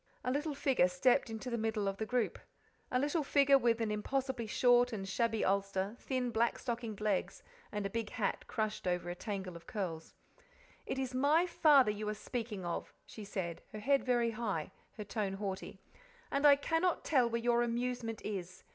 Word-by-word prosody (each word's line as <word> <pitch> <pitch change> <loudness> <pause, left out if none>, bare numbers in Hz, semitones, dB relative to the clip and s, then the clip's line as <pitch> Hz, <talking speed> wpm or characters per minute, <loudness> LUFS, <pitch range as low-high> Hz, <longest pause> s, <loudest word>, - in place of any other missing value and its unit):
A 250 - 0
little 295 +2 -1
figure 265 -10 +3
stepped 235 +8 +2
into 225 +3 -5
the 235 - -1
middle 220 -2 -1
of 195 0 -2
the 220 - -3
group 245 -2 0 0.5
a 250 - +2
little 290 +5 +1
figure 275 -1 +5
with 235 -2 +2
an 220 -2 0
impossibly 255 +2 -2
short 245 +2 +4
and 195 -4 -4
shabby 225 +2 0
ulster, 195 +1 0
thin 255 -2 -2
black 230 +1 +1
stockinged 230 -4 -4
legs, 210 -3 -1 0.3
and 210 -1 -3
a - - -1
big 230 -1 -2
hat 220 -5 -2
crushed 215 -3 -2
over 175 -1 -1
a - - -5
tangle 190 -3 -5
of 170 - -12
curls. 170 -6 -4 0.7
"It - - -2
is 260 -1 -2
my 290 +7 +4
father 290 -9 +5
you 210 0 -4
are 215 - -2
speaking 215 -4 -5
of," 170 - -3
she 215 - -9
said, 185 -4 -4
her 215 - -5
head 275 +6 +2
very 240 -2 +2
high, 210 -9 -3 0.3
her 210 - -4
tone 205 -1 -2
haughty, 195 -1 -5 0.5
"and 280 +1 +4
I 285 - +9
cannot 325 +5 0
tell 255 -6 +3
where 235 0 -1
your 240 0 +2
amusement 240 -1 -2
is. 185 -3 -5
230 Hz, 190 wpm, -34 LUFS, 200-255 Hz, 0.7 s, I